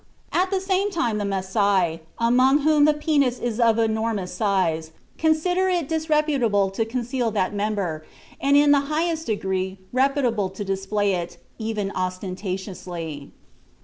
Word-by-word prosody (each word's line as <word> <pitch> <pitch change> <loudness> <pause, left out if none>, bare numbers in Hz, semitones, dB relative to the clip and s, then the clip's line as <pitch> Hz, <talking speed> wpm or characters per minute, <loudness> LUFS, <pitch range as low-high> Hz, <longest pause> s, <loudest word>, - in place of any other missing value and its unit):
At 370 +1 +2
the 385 -1 0
same 385 +1 0
time 235 - -1
the 205 - -2
Masai, 190 -3 +1 0.2
among 255 +5 +4
whom 300 0 +4
the 305 - +5
penis 290 -5 +1
is 240 -2 -3
of 230 -2 +4
enormous 220 -4 -1
size, 180 -5 0 0.3
consider 355 +4 +2
it 350 -5 0
disreputable 300 - +1
to 220 +3 -1
conceal 245 +1 -2
that 205 -3 -1
member, 200 -6 -2 0.4
and 280 +1 +4
in 290 0 +5
the 285 - +6
highest 320 +1 -1
degree 190 -3 -2 0.2
reputable 255 -6 +1
to 195 +2 -6
display 195 +1 0
it, 175 -1 -4 0.2
even 215 -3 -2
ostentatiously. 185 -4 -5
220 Hz, 140 wpm, -23 LUFS, 190-290 Hz, 0.4 s, the